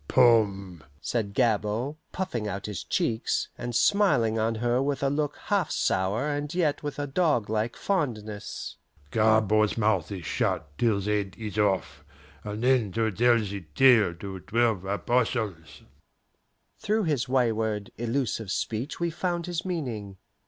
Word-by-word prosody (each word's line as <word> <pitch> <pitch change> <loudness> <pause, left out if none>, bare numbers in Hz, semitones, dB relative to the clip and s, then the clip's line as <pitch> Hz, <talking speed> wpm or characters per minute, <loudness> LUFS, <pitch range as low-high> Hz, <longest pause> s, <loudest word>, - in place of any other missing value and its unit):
"Poom!" 100 -8 +3 0.2
said 100 +2 -2
Gabord, 115 +3 +1 0.2
puffing 125 - -3
out 100 -1 -4
his 105 -4 -5
cheeks, 110 0 -1
and 120 -1 -5
smiling 120 - +3
on 115 +1 +1
her 120 +3 +1
with 140 0 -1
a 135 - +2
look 145 0 -1
half 200 -5 +1
sour, 100 +9 0
and 145 0 -2
yet 155 -5 +1
with 145 -1 -5
a 145 - -2
doglike 120 - 0
fondness, 110 - -3 0.3
"Gabord's 110 -1 +3
mouth 105 -5 +1
is 90 -5 -6
shut 75 - -1
till 110 -4 +2
's 100 - -5
head 105 -2 -1
is 105 -2 -4
off, 95 -7 0 0.4
and 105 +2 -5
then 125 -6 +3
to 110 -1 +1
tell 120 +4 +4
the 100 -3 -3
tale 115 -9 +5
to 95 +2 -7
Twelve 110 -2 0
Apostles!" 105 - -1 1.0
Through 215 +1 0
his 140 -7 0
wayward, 110 -5 0
illusive 120 -3 -1
speech 115 - -3
we 170 0 0
found 175 0 -2
his 175 -1 -3
meaning. 120 - -4
115 Hz, 145 wpm, -27 LUFS, 105-135 Hz, 1.0 s, tale